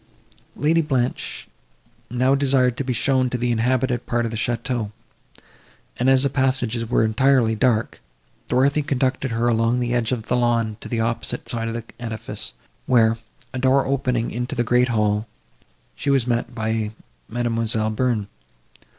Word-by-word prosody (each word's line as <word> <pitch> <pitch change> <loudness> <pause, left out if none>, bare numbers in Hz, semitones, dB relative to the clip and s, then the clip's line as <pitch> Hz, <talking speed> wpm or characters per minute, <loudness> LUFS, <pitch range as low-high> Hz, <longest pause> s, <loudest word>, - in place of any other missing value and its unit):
Lady 160 +3 +2
Blanche 130 -6 -2 0.6
now 125 +2 +2
desired 130 -3 +3
to 140 - -2
be 130 - -2
shown 130 +1 +2
to 125 - -2
the 120 0 0
inhabited 125 +1 0
part 120 0 0
of 115 - -3
the - - -4
château; 120 -1 -2 1.0
and, 125 +2 +1
as 135 0 +5
the 140 - +2
passages 130 -4 0
were 120 - +3
entirely 120 +1 +3
dark, 115 0 +1 0.5
Dorothée 140 +3 +2
conducted 130 0 0
her 115 +1 0
along 115 +1 +2
the 120 -1 -1
edge 120 -1 +1
of 115 -4 -2
the 125 - 0
lawn 115 -3 +1
to - - -8
the 115 -2 0
opposite 115 +1 -2
side 115 -1 -2
of 115 - -3
the 115 - -4 0.2
edifice, 115 -1 -5 0.3
where, 115 -2 +4 0.3
a 130 - -3
door 135 +1 +3
opening 125 -3 0
into 125 +4 -3
the 120 - +1
great 125 +1 +3
hall, 105 -2 +1 0.7
she - - -3
was 135 -4 +3
met 120 0 -1
by 110 -1 -1 0.4
Mademoiselle 115 -2 0
Bearn. 115 -2 0
120 Hz, 160 wpm, -22 LUFS, 115-130 Hz, 1.0 s, as